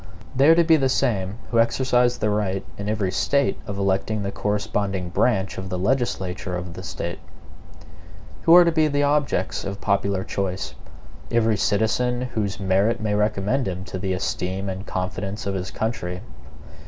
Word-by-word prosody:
They 135 Hz, +4 st, +5 dB
are 165 Hz, -, +8 dB
to 170 Hz, -, +5 dB
be 160 Hz, -1 st, +5 dB
the 135 Hz, -2 st, +1 dB
same 105 Hz, -7 st, 0 dB
who 115 Hz, -, +3 dB
exercise 125 Hz, +1 st, +2 dB
the 105 Hz, -2 st, 0 dB
right 100 Hz, -2 st, -1 dB
in 100 Hz, +1 st, -4 dB
every 105 Hz, -4 st, 0 dB
State 140 Hz, +7 st, +1 dB
of 100 Hz, -, -4 dB
electing 100 Hz, +2 st, 0 dB
the 100 Hz, -, -2 dB
corresponding 100 Hz, -3 st, -1 dB
branch 95 Hz, 0 st, +1 dB
of 95 Hz, 0 st, -6 dB
the 90 Hz, -, -2 dB
legislature 95 Hz, -4 st, -1 dB
of 90 Hz, -1 st, -6 dB
the 95 Hz, -, -8 dB
State. 85 Hz, -1 st, -5 dB, 1.2 s
Who 165 Hz, -, +7 dB
are 180 Hz, -, +10 dB
to 170 Hz, -, +3 dB
be 160 Hz, -1 st, +3 dB
the 145 Hz, -1 st, +1 dB
objects 145 Hz, -9 st, 0 dB
of 100 Hz, 0 st, -5 dB
popular 100 Hz, -1 st, 0 dB
choice? 95 Hz, -1 st, -3 dB, 0.6 s
Every 115 Hz, -2 st, +2 dB
citizen 110 Hz, +5 st, +1 dB
whose 100 Hz, -4 st, -2 dB
merit 100 Hz, +4 st, +2 dB
may 110 Hz, -1 st, -1 dB
recommend 105 Hz, +5 st, +1 dB
him 95 Hz, 0 st, -3 dB
to 95 Hz, -, -5 dB
the 95 Hz, 0 st, -1 dB
esteem 95 Hz, +1 st, -2 dB
and 95 Hz, +2 st, -6 dB
confidence 95 Hz, +3 st, -3 dB
of 100 Hz, -, -1 dB
his 95 Hz, 0 st, -3 dB
country. 90 Hz, -5 st, -3 dB
100 Hz, 170 wpm, -23 LUFS, 95-120 Hz, 1.2 s, are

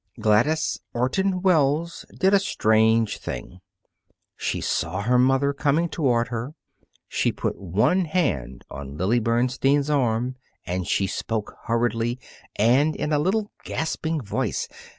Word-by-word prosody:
Gladys 120 Hz, +10 st, +2 dB, 0.2 s
Orton 180 Hz, +10 st, 0 dB
Wells 165 Hz, -2 st, +2 dB
did 190 Hz, +1 st, +3 dB
a 200 Hz, -, +6 dB
strange 110 Hz, -, +2 dB
thing. 90 Hz, +9 st, -7 dB, 0.8 s
She -, -, -2 dB
saw 95 Hz, -, -1 dB
her 125 Hz, +3 st, +3 dB
mother 135 Hz, +2 st, +3 dB
coming 150 Hz, +4 st, +1 dB
toward 125 Hz, -7 st, +1 dB
her. 120 Hz, +5 st, -5 dB, 0.5 s
She -, -, 0 dB
put -, -, -3 dB
one 110 Hz, -, +2 dB
hand 80 Hz, -, -1 dB
on 70 Hz, 0 st, -7 dB
Lily 105 Hz, +8 st, +2 dB
Bernstein's 130 Hz, +5 st, +1 dB
arm 125 Hz, -2 st, 0 dB, 0.3 s
and 90 Hz, 0 st, -3 dB
she 100 Hz, -, +1 dB
spoke 110 Hz, +2 st, -3 dB
hurriedly 115 Hz, +1 st, 0 dB, 0.4 s
and 130 Hz, +8 st, +3 dB
in 150 Hz, -, -2 dB
a 145 Hz, -, +3 dB
little 205 Hz, +6 st, 0 dB
gasping 160 Hz, 0 st, -2 dB
voice. 105 Hz, -8 st, -2 dB
125 Hz, 130 wpm, -24 LUFS, 110-155 Hz, 0.8 s, a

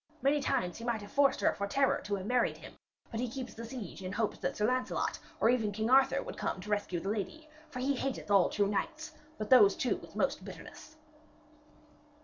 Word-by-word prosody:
Many 285 Hz, +2 st, +3 dB
times 180 Hz, -10 st, -1 dB
he -, -, -8 dB
might 235 Hz, -3 st, -1 dB
have 205 Hz, -, -11 dB
forced 280 Hz, -1 st, +3 dB
her -, -, +3 dB
for 200 Hz, -, -3 dB
terror 270 Hz, +5 st, +2 dB
to 205 Hz, -, -1 dB
have 190 Hz, -1 st, -5 dB
married 245 Hz, +2 st, +1 dB
him, -, -, -11 dB, 0.4 s
but 225 Hz, -, -3 dB
he 250 Hz, 0 st, -1 dB
keeps 255 Hz, +1 st, -6 dB
the 230 Hz, -, -8 dB
siege 230 Hz, -7 st, -7 dB
in 185 Hz, 0 st, -5 dB
hopes 220 Hz, +1 st, -1 dB
that -, -, -2 dB
Sir 210 Hz, -, +1 dB
Lancelot 255 Hz, +2 st, 0 dB, 0.2 s
or -, -, +4 dB
even 225 Hz, -4 st, +1 dB
King 220 Hz, +4 st, -1 dB
Arthur 265 Hz, 0 st, +5 dB
would -, -, -8 dB
come -, -, -2 dB
to 210 Hz, +3 st, -7 dB
rescue 205 Hz, -4 st, 0 dB
the 195 Hz, -, -4 dB
lady. 225 Hz, +10 st, -4 dB, 0.2 s
For 265 Hz, -, -8 dB
he 265 Hz, +3 st, +1 dB
hateth 265 Hz, -5 st, -3 dB
all 195 Hz, -3 st, +5 dB
true 205 Hz, -, +1 dB
knights, 310 Hz, +10 st, -3 dB, 0.3 s
but 215 Hz, +2 st, -5 dB
those 205 Hz, -6 st, +8 dB
two 250 Hz, -, 0 dB
with -, -, -14 dB
most -, -, 0 dB
bitterness.' 310 Hz, -, -11 dB
230 Hz, 220 wpm, -32 LUFS, 205-265 Hz, 0.4 s, those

